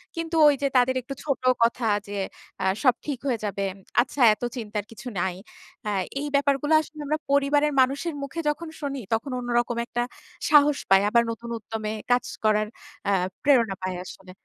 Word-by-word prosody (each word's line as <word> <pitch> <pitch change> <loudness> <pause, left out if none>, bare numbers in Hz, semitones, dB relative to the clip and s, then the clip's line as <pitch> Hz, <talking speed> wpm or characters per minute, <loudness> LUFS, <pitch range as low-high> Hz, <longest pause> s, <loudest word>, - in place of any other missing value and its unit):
কিন্তু 330 0 -3
ওই 290 - +5
যে, 280 - +2
তাদের 255 +1 +3
একটু 275 +3 -7
ছোট 275 -4 -1 0.2
কথা 235 0 +1 0.2
যে, 205 0 -5 0.5
আ - - 0 0.2
সব 255 -3 +6
ঠিক 280 -5 -3
হয়ে 240 -4 0
যাবে। 200 -1 -2 0.4
আচ্ছা 265 +2 -4
এত 215 - -9
চিন্তার 210 -3 -3
কিছু 240 +3 -10
নাই। 185 -1 -1 0.5
আ - - +1 0.3
এই 295 - -3
ব্যাপারগুলো 280 +2 +2
আসলে 310 0 -12
আমরা 305 +2 0
পরিবারের 290 +1 +3
মানুষের 280 +5 0
মুখে 305 +4 -5
যখন 330 +3 -3
শুনি, 275 -2 -3
তখন 240 +5 -1
অন্যরকম 240 -1 0
একটা 240 0 -1 0.5
সাহস 295 -1 +6
পাই। 195 0 +7
আবার 235 +1 +4
নতুন 235 +1 -7
উদ্যমে 215 0 -4 0.2
কাজ 245 0 +4 0.2
করার 215 0 +3 0.4
আ - - +3 0.3
প্রেরণা 235 -8 +4
পাই 185 -1 -2
আসলে। 185 0 -11
250 Hz, 175 wpm, -25 LUFS, 220-285 Hz, 0.5 s, পাই